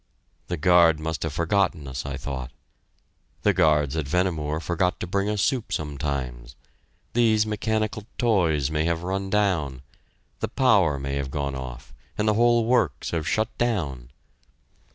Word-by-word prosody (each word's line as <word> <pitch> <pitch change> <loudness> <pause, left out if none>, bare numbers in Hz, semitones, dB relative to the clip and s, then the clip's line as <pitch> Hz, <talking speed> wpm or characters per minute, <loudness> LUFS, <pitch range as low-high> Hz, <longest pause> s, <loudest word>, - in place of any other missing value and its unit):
The 90 - -2
guard 85 -1 +5
must 80 0 -3
have 80 -3 -2
forgotten 85 -2 0
us, 65 +1 -5
I 70 -1 -4
thought.... 65 -2 -5 0.9
The - - +4
guards 75 -2 +3
at 80 -4 -2
Vehnemoor 80 -2 0
forgot 90 +2 0
to - - -3
bring 100 +3 -1
us 105 -2 0
soup 125 -4 0
sometimes.... 70 -5 -4 0.6
These 110 -2 +3
mechanical 110 0 -2
toys 85 - +2
may 80 0 0
have 85 0 -1
run 95 +1 -2
down; 85 -11 0 0.6
the - - -1
power 100 - +3
may 70 0 -3
have 70 -1 -3
gone 70 0 -2
off, 65 -2 -8 0.2
and 105 - 0
the 105 - +4
whole 120 +1 +3
works 115 - +1
have 80 -1 -2
shut 110 +4 0
down. 80 - -1
80 Hz, 155 wpm, -25 LUFS, 70-105 Hz, 0.9 s, guard